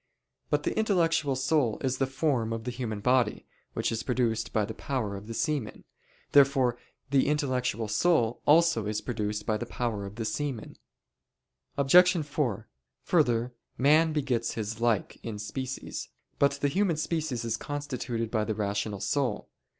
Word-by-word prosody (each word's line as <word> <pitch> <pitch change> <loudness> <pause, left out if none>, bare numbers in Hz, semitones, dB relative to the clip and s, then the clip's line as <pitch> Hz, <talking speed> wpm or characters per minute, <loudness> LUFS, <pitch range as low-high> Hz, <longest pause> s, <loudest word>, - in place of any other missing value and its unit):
But - - +1
the - - -1
intellectual 165 -9 +2
soul 130 -3 +1
is 130 -1 -1
the 135 - +2
form 135 -4 0
of 115 0 -4
the 125 - -3
human 115 -4 -4
body, 125 -2 +2 0.3
which - - -1
is 115 - -2
produced 120 -3 0
by 105 -1 +1
the 110 - -6
power 110 -5 -3
of 100 +2 -9
the 115 - -5
semen. 150 -8 -2 0.5
Therefore 135 -3 +5 0.4
the 140 -1 +3
intellectual 130 -6 0
soul 120 +1 +2
also 150 -8 +4
is 105 0 -1
produced 105 -3 -3
by 110 - +1
the 120 - -5
power 110 -6 -3
of 100 - -10
the 115 -1 -4
semen. 120 +1 -3 1.0
Obj. 175 +4 +5
4: 125 -7 -2 0.4
Further, 125 -7 +2 0.2
man 155 +4 +4
begets 130 -6 -1
his 110 0 -4
like 115 -4 0
in 110 -3 -5
species. 130 +5 -5 0.3
But 140 0 +4
the 140 +1 0
human 180 +1 +1
species 155 -7 -2
is 115 - 0
constituted 125 -6 -4
by 110 -2 +1
the 110 0 -2
rational 100 -1 -2
soul. 135 -7 -1
125 Hz, 160 wpm, -28 LUFS, 110-145 Hz, 1.0 s, Therefore